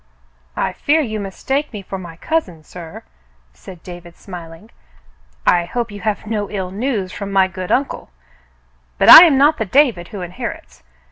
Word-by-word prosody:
"I - - -1
fear 310 +2 +1
you 220 -6 -4
mistake 265 +9 -3
me 210 -4 -8
for 195 0 -7
my 170 -3 -10
cousin, 185 - -3
sir," 165 +1 -11 0.5
said 165 - -14
David, 175 -1 -11
smiling. 175 +2 -11 0.7
"I 175 -1 +3
hope 235 +4 -4
you 205 -1 -9
have 215 -1 -3
no 210 -2 -3
ill 190 -3 -5
news 205 -3 -3
from 200 0 -7
my 190 -1 +3
good 185 -1 -7
uncle; 275 - -1 0.9
but - - +3
I 340 - +12
am 300 -5 +3
not 295 +3 +3
the 220 - -1
David 225 -6 +2
who 200 - -8
inherits. 175 - -8
195 Hz, 165 wpm, -18 LUFS, 180-240 Hz, 0.9 s, I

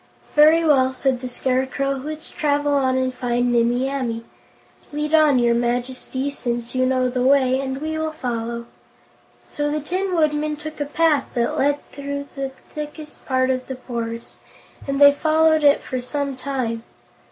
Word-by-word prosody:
"Well," 300 -4 +5
said 260 -1 0
the 255 0 -5
Scarecrow, 260 +2 0
"let's 300 +3 -5
travel 290 -1 0
on 260 -2 +2
and 260 0 0
find 245 -1 0
Nimmie 240 +2 +2
Amee. 245 -5 -3 0.7
Lead 300 +1 -3
on, 305 -4 +5
your 240 -1 +3
Majesty, 250 +3 -2
since 240 -3 -4
you 255 0 +2
know 255 -1 +2
the 250 0 -2
way, 260 0 +4
and 265 0 -3
we 315 +1 -3
will 315 0 -1
follow." 235 -4 -4 0.8
So 295 0 -2
the 300 +1 -1
Tin 365 +5 -2
Woodman 305 -1 +1
took 305 +1 -8
a - - 0
path 300 -1 +2
that 235 -1 0
led 285 +1 0
through 280 0 -5
the 275 -1 -3 0.2
thickest 300 0 -8
part 260 -1 +2
of 255 0 -3
the 265 - -4
forest, 235 -2 -6 0.5
and 275 0 -1
they 285 0 +8
followed 315 +1 +3
it 285 0 +5
for 255 -1 -3
some 280 +2 -3
time. 255 -4 -3
270 Hz, 165 wpm, -22 LUFS, 255-295 Hz, 0.8 s, they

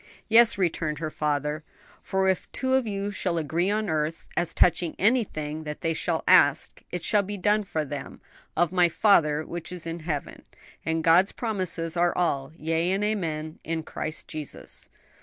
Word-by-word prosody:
"Yes," 230 0 +6
returned 165 -4 -1
her 155 +1 -4
father, 150 +1 -1 0.4
"for 190 0 0
'If 190 -1 0
two 260 0 -1
of 260 -3 +2
you 200 0 -2
shall 185 -3 -1
agree 165 +4 0
on 215 +1 0
earth, 155 -1 -2
as 175 -1 0
touching 175 -1 +2
anything 160 -9 0
that 150 -1 -6
they 165 -1 0
shall - - -1
ask, - - +4
it 180 -2 -5
shall 210 -2 +3
be 205 +1 -5
done 210 +3 +2
for 155 -5 -2
them 145 0 -7 0.4
of 175 +1 +2
my 180 -2 +4
Father 155 -6 +3
which 175 0 -6
is 180 -3 -5
in 165 +1 -4
heaven'; 155 -3 -4 0.4
and 160 0 -1
God's 175 +4 +5
promises 185 -7 -2
are 175 0 +2
all 140 -6 0
'yea 165 +2 0
and 195 +2 0
amen 160 -7 -2
in 165 -1 -3
Christ 155 0 -5
Jesus.'" 155 -2 -8
170 Hz, 175 wpm, -26 LUFS, 155-195 Hz, 0.4 s, Yes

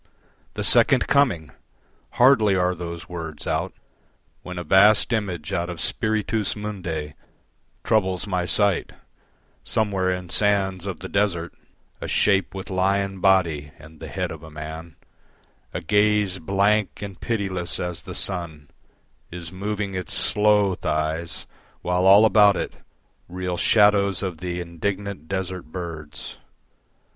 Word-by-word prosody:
The 105 - -3
Second 120 +4 +5
Coming! 110 - +2 0.6
Hardly 115 -6 +5
are 90 0 +2
those 85 -1 -7
words 80 -4 -7
out - - -1 0.7
When 90 0 -8
a 90 - -4
vast 100 +7 +5
image 90 -8 -3
out 85 +1 -1
of 85 -2 -6
Spiritus 110 +4 0
Mundi 90 -8 -5 0.7
Troubles 95 -4 +1
my 90 -3 -1
sight: 100 -3 +2 0.7
somewhere 95 -4 0
in 90 -1 -5
sands 100 -3 +1
of 90 -5 -5
the 95 - -5
desert 95 -4 -1 0.5
A - - -4
shape 100 -1 +1
with 95 0 -7
lion 95 +1 0
body 85 -6 +2
and 80 0 -15
the 80 - -8
head 90 +2 -3
of 80 -2 -8
a 80 - -11
man, 80 +1 -8 0.8
A - - -4
gaze 105 +1 +2
blank 100 +4 +1
and 100 -3 -8
pitiless 95 -6 -2
as 90 -1 -3
the - - -9
sun, 80 -6 -3 0.6
Is 85 -1 -7
moving 100 +1 -3
its 95 -3 -3
slow 105 -2 +3
thighs, 80 0 -3 0.4
while 90 +1 +1
all 100 +3 +8
about 105 -2 +5
it - - -3 0.6
Reel 90 0 -3
shadows 100 0 +3
of 90 -4 -4
the 90 -1 -4
indignant 95 0 -4
desert 95 -1 -4
birds. 75 -7 -7
95 Hz, 135 wpm, -23 LUFS, 85-100 Hz, 0.8 s, all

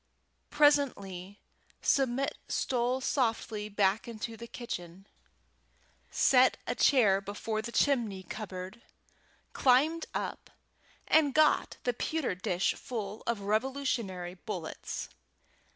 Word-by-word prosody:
Presently 205 -11 +2 0.4
Submit 270 0 +1
stole 250 +1 0
softly 225 -5 -1
back 200 +1 +1
into 230 0 -5
the 235 +1 -9
kitchen, 190 -6 -7 1.0
set 255 -1 +4
a - - -1
chair 210 -8 +4
before 215 +2 -3
the 235 - -6
chimney 235 -9 +1
cupboard, 190 +1 -7 0.7
climbed 290 +6 +3
up, - - -4 0.6
and 295 -3 +4
got 310 -1 +3
the 245 - +1
pewter 310 0 -1
dish 180 0 0
full 220 -5 -6
of 230 -3 0
Revolutionary 215 -5 -1
bullets. 185 -3 -6
225 Hz, 100 wpm, -30 LUFS, 195-260 Hz, 1.0 s, set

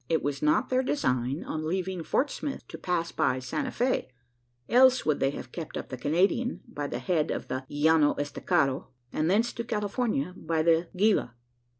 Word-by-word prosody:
It 160 -2 +1
was 140 -1 -2
not 150 +11 +2
their 255 0 +3
design, 130 - 0
on 155 0 -4
leaving 185 +1 -2
Fort 270 - 0
Smith, 285 - -5
to - - -7
pass 175 -2 -1
by 130 - +1
Santa 130 - -3
Fe 255 - 0 0.6
else 255 +1 +5
would 155 -2 +1
they 135 - +2
have 140 - -7
kept 160 -3 -6
up - - -6
the 130 - -4
Canadian, 190 - +1
by 145 -1 -4
the - - -3
head 165 -4 0
of - - -4
the 130 +1 -3
Llano 150 0 +3
Estacado; 140 -1 0 0.3
and 155 +2 +1
thence 225 +5 +2
to 235 - -4
California 210 - -1
by 160 -2 -1
the 165 +1 +3
Gila. 195 - +2
165 Hz, 185 wpm, -28 LUFS, 145-220 Hz, 0.6 s, else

